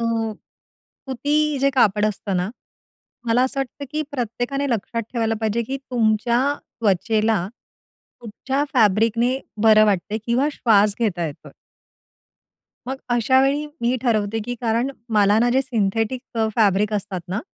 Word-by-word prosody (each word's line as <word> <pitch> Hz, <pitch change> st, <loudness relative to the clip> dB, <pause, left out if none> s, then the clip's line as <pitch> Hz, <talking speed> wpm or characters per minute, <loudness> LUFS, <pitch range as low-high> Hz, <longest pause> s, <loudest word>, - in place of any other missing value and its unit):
अ, -, -, -1 dB, 1.0 s
सुती 295 Hz, +2 st, 0 dB
जे 275 Hz, 0 st, +3 dB
कापड 215 Hz, -5 st, +3 dB
असतं 200 Hz, -2 st, -3 dB
ना. 180 Hz, +3 st, -1 dB, 0.8 s
मला 235 Hz, +2 st, +3 dB
असं 270 Hz, +1 st, -2 dB
वाटतं, 270 Hz, +2 st, -5 dB
की 305 Hz, +1 st, -1 dB
प्रत्येकाने 245 Hz, +3 st, -2 dB
लक्षात 230 Hz, +1 st, -2 dB
ठेवायला 225 Hz, -2 st, 0 dB
पाहिजे, 220 Hz, +1 st, 0 dB
की 265 Hz, +4 st, -4 dB
तुमच्या 235 Hz, 0 st, +2 dB, 0.4 s
त्वचेला. 215 Hz, -1 st, +1 dB, 0.7 s
कुठच्या 265 Hz, +5 st, -3 dB
फॅब्रिकने 230 Hz, +3 st, +2 dB, 0.2 s
बरं 215 Hz, -1 st, +7 dB
वाटतंय 205 Hz, +2 st, 0 dB
किंवा 250 Hz, +5 st, +2 dB
श्वास 210 Hz, -5 st, +3 dB
घेता 180 Hz, -7 st, 0 dB
येतोय. 145 Hz, -, -10 dB, 1.4 s
मग 265 Hz, -, -2 dB, 0.2 s
अशावेळी 265 Hz, +5 st, +2 dB
मी 240 Hz, +2 st, +1 dB
ठरवते, 220 Hz, -3 st, 0 dB
की 245 Hz, -, -4 dB
कारण 235 Hz, +3 st, 0 dB, 0.2 s
मला 205 Hz, 0 st, +4 dB
ना 240 Hz, +2 st, +3 dB
जे 260 Hz, +2 st, +3 dB
सिंथेटिक 225 Hz, 0 st, -1 dB, 0.4 s
फॅब्रिक 210 Hz, -1 st, +3 dB
असतात 200 Hz, -3 st, -3 dB
ना, 190 Hz, +4 st, -2 dB
230 Hz, 130 wpm, -22 LUFS, 210-255 Hz, 1.4 s, बरं